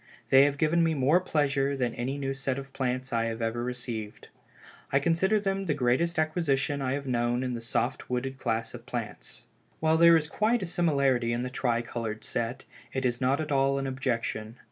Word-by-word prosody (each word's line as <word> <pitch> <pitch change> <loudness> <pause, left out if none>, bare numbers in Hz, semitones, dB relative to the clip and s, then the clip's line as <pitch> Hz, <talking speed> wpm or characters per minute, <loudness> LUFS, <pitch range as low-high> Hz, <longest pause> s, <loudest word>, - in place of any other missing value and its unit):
They 135 +1 +8
have 145 0 0
given 165 +3 +3
me 165 -1 +2
more 145 +6 +4
pleasure 140 -4 0
than 125 -2 -1
any 125 +3 -3 0.2
set 135 -1 -2
of 140 0 -7
new - - -30
plants 130 -1 -2
I 115 0 +1
have 115 0 -3
ever 115 +1 -1
received. 120 -4 -5 0.6
I 135 - +4
consider 175 +8 +2
them 195 -1 -2
the 150 - +1
greatest 145 +6 +1
acquisition 145 -3 0
I 130 -1 0
have 140 0 -3
known 120 0 0
in 125 -1 -2
the 120 - -4
soft 115 - -1
wooded 130 +2 -2
class 115 -2 -2
of - - -10
plants. - - -6 0.3
While 160 0 +3
there 170 0 +7
is 150 -2 -2
quite 215 +6 +1
a - - -1
similarity 140 -9 +1
in 120 +1 -1
the 125 - -4
tri 120 -2 0
colored 115 -2 -5
set, 120 +2 -3 0.3
it 130 -1 -2
is 120 0 0
not 130 +3 +2
at 155 -1 -3
all 135 0 +2
an 135 - -2
objection. 120 -4 -2
135 Hz, 205 wpm, -28 LUFS, 120-150 Hz, 0.6 s, They